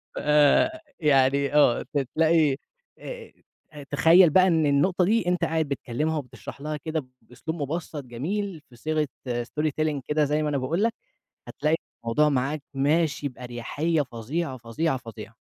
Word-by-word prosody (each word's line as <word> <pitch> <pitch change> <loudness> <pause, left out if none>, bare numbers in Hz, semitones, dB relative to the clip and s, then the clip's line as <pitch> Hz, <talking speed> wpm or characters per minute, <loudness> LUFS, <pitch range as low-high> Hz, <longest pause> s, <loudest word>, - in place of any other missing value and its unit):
ف - - -8 0.8
يعني 140 -2 +3
آه، 145 -5 +4
ت 145 - +2 0.2
تلاقي 160 -4 +3 0.4
آآ، 485 -2 -9 0.6
تخيّل 165 +4 +6
بقى 185 +4 +5
إن 160 -3 +3
النُّقطة 175 +6 +2
دي 215 -1 +1
أنت 180 -1 +1
قاعد 160 -1 +1
بتكلِّمها 145 +4 -2
وبتشرَح 140 0 -8
لها 150 0 -3
كده 155 -1 -4 0.2
بأسلوب 160 +6 -7
مُبسّط، 150 0 -4
جميل 165 - -4
في 120 - -17
صيغة 155 +3 -1 0.4
story 150 +6 -2
telling 150 -2 0
كده 150 0 +2
زي 150 +2 0
ما 150 - 0
أنا 145 - 0
باقول 160 +10 -1
لك، 230 0 +2 0.5
هتلاقي 155 +1 0 0.3
الموضوع 135 +7 +2
معاك 140 +2 -1
ماشي 145 +1 +1
بأريحيّة 125 +6 -2
فظيعة، 130 +3 -4
فظيعة، 130 +5 -1
فظيعة. 115 -3 -10
150 Hz, 145 wpm, -25 LUFS, 135-165 Hz, 0.8 s, تخيّل